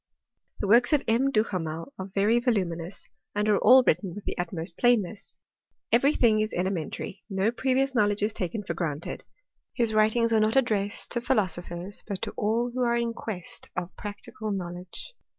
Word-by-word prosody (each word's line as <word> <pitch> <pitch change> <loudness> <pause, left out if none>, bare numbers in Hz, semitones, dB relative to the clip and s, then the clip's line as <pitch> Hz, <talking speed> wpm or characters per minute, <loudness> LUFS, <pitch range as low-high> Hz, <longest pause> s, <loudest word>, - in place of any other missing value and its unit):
The 205 - -1
works 240 +8 +5
of 285 -2 +3
M. 240 +5 +3
Duhamel 185 - -2
are 190 - -4
very 210 +4 +3
voluminous, 185 -7 -2 0.3
and 210 +1 +1
are 210 -1 +4
all 255 +4 +7
written 185 -5 +1
with 205 - -9
the - - -3
utmost 170 -1 -3
plainness. 225 -4 +1 0.5
Every 270 +5 +5
thinj^ 220 -3 +4
is 215 - -2
elementary, 180 +1 -3
no 195 +2 +1
previous 265 +2 +1
knowledge 205 -3 +2
is 210 +1 +1
taken 205 +2 -3
for - - -3
granted. 155 -3 -4 0.5
His 230 -3 +1
writings 220 +2 +3
are 220 - +5
not 215 +2 +2
addressed 210 -6 0
to 240 - -1
philo 240 -4 +2
sophers, 175 +2 -6
but 200 -3 -3
to 215 - -2
all 225 +3 0
those - - -13
who 255 - -2
are 235 -1 +2
in 235 -1 -1
quest 205 -6 -7
of 175 - -4
practical 210 +1 -7
knowledge. 180 - -6
210 Hz, 180 wpm, -27 LUFS, 185-235 Hz, 0.5 s, all